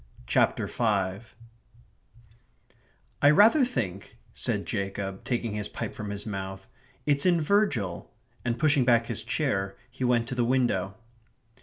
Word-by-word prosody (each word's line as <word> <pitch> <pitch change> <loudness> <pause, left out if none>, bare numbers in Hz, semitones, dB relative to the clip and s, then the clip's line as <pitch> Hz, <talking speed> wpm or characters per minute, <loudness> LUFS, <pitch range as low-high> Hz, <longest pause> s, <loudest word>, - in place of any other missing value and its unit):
CHAPTER - - +2
FIVE 105 0 -1 1.9
"I 145 - +7
rather 215 - +6
think," 100 - -3 0.2
said - - -1
Jacob, 95 0 -4
taking 120 -3 -2
his 105 -1 -3
pipe - - -5
from 105 -1 -6
his 100 0 -4
mouth, 95 -2 -6 0.4
"it's 140 -1 +2
in 175 -2 +4
Virgil," 150 - 0 0.3
and 120 -1 -1
pushing 145 -3 +3
back 120 -2 +4
his 115 -3 -3
chair, 100 -6 -1 0.2
he 130 +1 -6
went 120 -2 +2
to - - -3
the 125 -1 +1
window. 115 -6 +1
115 Hz, 135 wpm, -27 LUFS, 100-130 Hz, 1.9 s, I